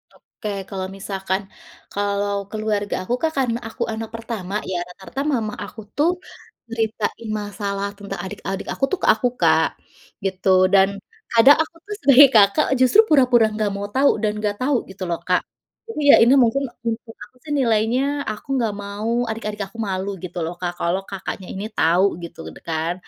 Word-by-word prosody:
Oke 210 - -9 0.2
kalau 190 -2 -4
misalkan, 195 -1 -2 0.5
kalau 200 0 0
keluarga 215 -2 -2
aku 210 - -2
Kak 320 -1 +1
karena 240 -3 +1
aku - - -4
anak 220 0 -5
pertama 225 -5 -6 0.2
ya 180 - -1
rata-rata 195 +9 -7
mama 215 -4 -1
aku 210 - -11 0.2
tuh, 300 +4 +3 0.6
ceritain 225 0 -2
masalah 200 -1 -3
tentang 200 -2 -7
adik-adik 195 0 -5
aku - - -8
tuh 385 - 0
ke - - +2
aku 220 +3 0
Kak, - - +4 0.6
gitu 190 0 -1 0.2
dan 195 0 +6 0.4
kadang 235 +5 +7
aku 320 - -16
tuh 415 0 -5
sebagai 280 +1 +8
Kakak 200 -1 +5
justru 260 - +5
pura-pura 250 -6 +5
enggak 215 -1 0
mau 200 0 -4
tahu 280 +1 +5
dan 210 - +2
enggak 210 -1 -1
tahu 275 +2 +2
gitu 190 0 -7
loh 170 - -1
Kak, 180 -1 +3 0.5
jadi 305 - -4
ya - - +11
ini 245 +3 +5
mungkin 255 +4 +1 0.2
menurut 225 0 -4
aku - - -39
sih 305 - -8
nilainya 230 +1 +2 0.3
aku 215 +7 -9
enggak 225 -4 0
mau 205 +3 -4 0.2
adik-adik 215 -2 -4
aku 195 - -25
malu 190 +1 -2
gitu 180 0 -7
loh 170 - -4
Kak 175 -1 -2
kalau 175 +3 0
Kakaknya 190 -1 -6
ini 195 +2 -5
tahu 175 +4 +4 0.2
gitu 170 - -9 0.2
de - - -12
kan. 165 +1 -1
210 Hz, 175 wpm, -22 LUFS, 195-230 Hz, 0.6 s, ya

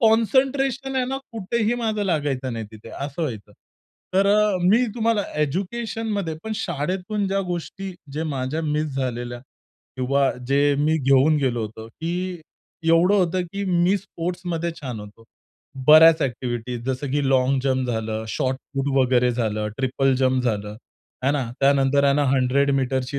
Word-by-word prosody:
Concentration 265 +3 +2
आहे 255 - +2
ना 270 +1 -2 0.2
कुठेही 225 +2 -1
माझं 220 -3 -1
लागायचं 145 -8 -1
नाही 115 -1 -4
तिथे 110 +1 -12
असं 140 +4 -5
व्हायचं. 110 -8 -5 0.6
तर 195 +1 +4
अ, 210 -1 +3
मी 220 +8 +4
तुम्हाला 230 -2 +1 0.2
एज्युकेशनमध्ये 200 - -2
पण 220 - -3
शाळेतून 185 +4 -2
ज्या 195 0 0
गोष्टी 180 +3 -5 0.2
जे 155 - -2
माझ्या 135 +5 -2
मिस 150 -2 -1
झालेल्या 120 -2 -3 0.6
किंवा 135 +2 +2 0.2
जे 140 +1 +3
मी 155 +2 +2
घेऊन 135 +3 +4
गेलो 125 -4 0
होतो, 110 +1 -7
की 175 +5 -4 0.5
एवढं 170 +4 +5
होतं 180 -1 +1
की 200 0 -3
मी 180 +1 +2
स्पोर्ट्समध्ये 175 -2 -4
छान 125 -6 -5
होतो. 105 +2 -13 0.6
बऱ्याच 160 +1 +8
एक्टिव्हिटीज 120 -1 -3
जसं 130 +1 -2
की 145 - +2
लाँग 130 +1 +3
जंप 130 -1 0
झालं, 110 -1 -3
शॉर्ट 130 +4 -1 0.2
पुट 135 0 -1
वगैरे 125 -1 +3
झालं, 110 -3 -1
ट्रिपल 135 0 +1
जंप 130 -1 +2
झालं, 105 -3 -2 0.5
आहे 135 +2 +2
ना. 135 -5 -2
त्यानंतर 140 0 +3
आहे 140 0 +4
ना 145 0 +2
100 135 +2 +2
मीटरची 130 +1 -1
145 Hz, 150 wpm, -23 LUFS, 130-190 Hz, 0.6 s, बऱ्याच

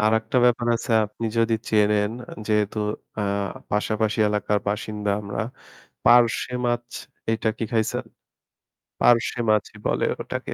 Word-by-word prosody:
আরেকটা 110 +2 +1
ব্যাপার 120 -1 +3
আছে, 120 - -6 0.2
আপনি 115 +2 -5
যদি 115 0 +3 0.2
চেনেন 105 -1 +3 0.2
আ - - -10
যেহেতু 105 0 +1 0.4
আ - - 0 0.5
পাশাপাশি 110 +1 0
এলাকার 105 0 +1
বাসিন্দা 105 0 -2
আমরা, 100 +1 -4 0.6
'পার্শে' 120 +1 +4
মাছ 120 0 -1 0.4
এইটা 110 0 0
কি - - -1
খাইছেন? 110 -2 0 1.0
'পার্শে' 120 0 +3
মাছই 105 -1 +1
বলে - - +1 0.2
ওটাকে। - - -5
110 Hz, 125 wpm, -24 LUFS, 105-115 Hz, 1.0 s, পার্শে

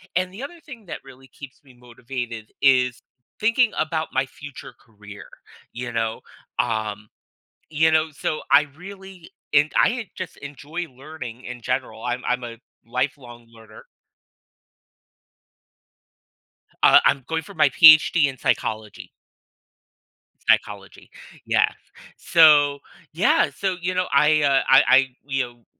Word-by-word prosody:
and 185 0 0
the 220 +7 -9
other 335 +4 -9
thing 240 -7 -12
that - - -6
really 135 0 -16
keeps 135 0 -13
me 130 -3 -19
motivated 120 -2 -8 0.2
is 125 -3 +3 0.4
thinking 230 +2 +2
about 155 0 -2
my 130 0 +1
future 145 0 -12
career, 105 -2 -14 0.5
you 120 +1 -6
know, 115 -1 -2 0.4
um, 110 -3 -2 0.6
you 160 +1 +2
know? 155 0 +1
So 155 +1 -3
I 140 +1 +6
really 190 -1 -12 0.2
and 150 +2 +4
I 240 -4 +1
just 185 -3 -7
enjoy 145 +5 -7
learning 130 -3 -10
in 125 0 -8
general. 125 -4 -4
I'm 125 +1 -3
I'm 125 0 -1
a 115 -1 -8 0.3
lifelong 125 -1 -5
learner. 110 -1 -16 3.0
Uh, - - +8
I'm 135 - +2
going 160 0 -2
for 200 - -13
my 155 -5 +3
PhD 155 +2 +6
in 135 -2 -4
psychology. 110 -2 -3 1.4
Psychology, - - -1 0.4
yes. - - +2 0.4
So, 145 -3 +5 0.3
yeah, 240 - +2
so, 190 -2 -2
you 185 +1 -2
know, 185 0 -1
I, 150 +2 +3
uh, 140 -1 +3
I 135 +1 +7
I 135 +1 +5 0.2
you 135 -2 -1
know, 120 -2 -12
140 Hz, 130 wpm, -22 LUFS, 120-160 Hz, 3.0 s, Uh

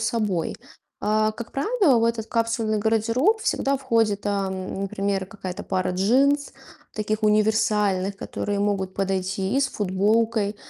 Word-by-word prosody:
собой. 215 -7 -1 0.5
А, 215 +1 +2
как 230 +1 -9
правило, 300 - +2
в 230 - +2
этот 230 -1 -1
капсульный 230 -2 0
гардероб 230 - +2
всегда 275 -10 0
входит, 225 -6 +1
а, 200 -1 0
м, 190 +1 -5
например, 195 0 -1
какая-то 190 -2 -7
пара 185 -1 -1
джинс, 270 +10 +2 0.4
таких 215 +1 -2
универсальных, 210 -2 +2
которые 205 0 -3
могут 200 -2 -1
подойти 190 +1 -1
и - - +3
с 270 - +2
футболкой. 210 +2 +1
215 Hz, 135 wpm, -24 LUFS, 195-230 Hz, 0.5 s, и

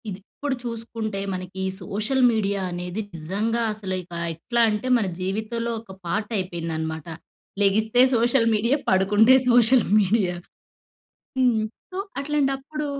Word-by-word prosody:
ఇది 190 -1 -6 0.2
ఇప్పుడు 285 -2 -1
చూసుకుంటే 230 -3 -4
మనకి 185 +1 -7
ఈ - - 0 0.2
సోషల్ 215 +8 -1
మీడియా 200 -3 0
అనేది 180 +4 -4
నిజంగా 205 +9 -1
అసలు 200 -3 -5
ఇక 175 0 -15 0.2
ఎట్లంటే 225 +6 0
మన 225 - 0
జీవితంలో 220 +5 -2
ఒక 225 - -14
పార్ట్ 210 +6 -2
అయిపోయిందనమాట. 165 -3 -4 0.5
లెగిస్తే 220 +4 +4
సోషల్ 235 +1 +3
మీడియా, 235 +6 +2
పడుకుంటే 205 +6 +5 0.2
సోషల్ 240 0 +5
మీడియా. 195 -3 +1 1.0
హ్మ్. 240 -4 +3 0.3
సో, 370 - -6 0.2
అట్లాంటప్పుడు, 285 +1 -1
215 Hz, 120 wpm, -24 LUFS, 190-235 Hz, 1.0 s, పడుకుంటే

